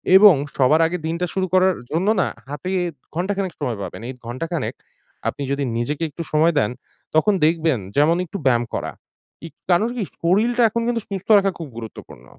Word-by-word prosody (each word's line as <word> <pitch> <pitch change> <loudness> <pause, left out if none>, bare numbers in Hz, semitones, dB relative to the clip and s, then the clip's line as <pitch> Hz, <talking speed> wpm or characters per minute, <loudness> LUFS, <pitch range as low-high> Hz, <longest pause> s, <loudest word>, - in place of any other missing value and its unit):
এবং 195 -2 +9 0.2
সবার 150 +5 +4
আগে 180 - -3
দিনটা 170 +2 -1
শুরু 190 -1 0
করার 185 0 +4 0.2
জন্য 170 +5 0
না - - +1 0.2
হাতে 145 +5 -5 0.5
ঘন্টাখানেক 190 +1 -1
সময় 125 -7 -2
পাবেন। - - -7
এই - - -4
ঘন্টাখানেক 160 +8 -3 0.6
আপনি 145 - -5
যদি 140 0 0
নিজেকে 145 +7 -2
একটু 160 +3 -6
সময় 160 +2 +4
দেন, 105 - +1 0.4
তখন 205 +7 +4
দেখবেন 160 -5 +2 0.2
যেমন 155 +4 +4
একটু 200 - -6
ব্যায়াম 120 -2 +3
করা। - - -3 0.6
ইক - - -15 0.2
কারন 210 +7 +3
কি 225 - 0 0.2
শরীরটা 225 +8 +2
এখন 235 +2 -2
কিন্তু 235 -1 0
সুস্থ 195 -3 -6
রাখা 195 0 +2
খুব 165 - -5
গুরুত্বপূর্ণ। 115 -2 -10
170 Hz, 175 wpm, -21 LUFS, 145-190 Hz, 0.6 s, এবং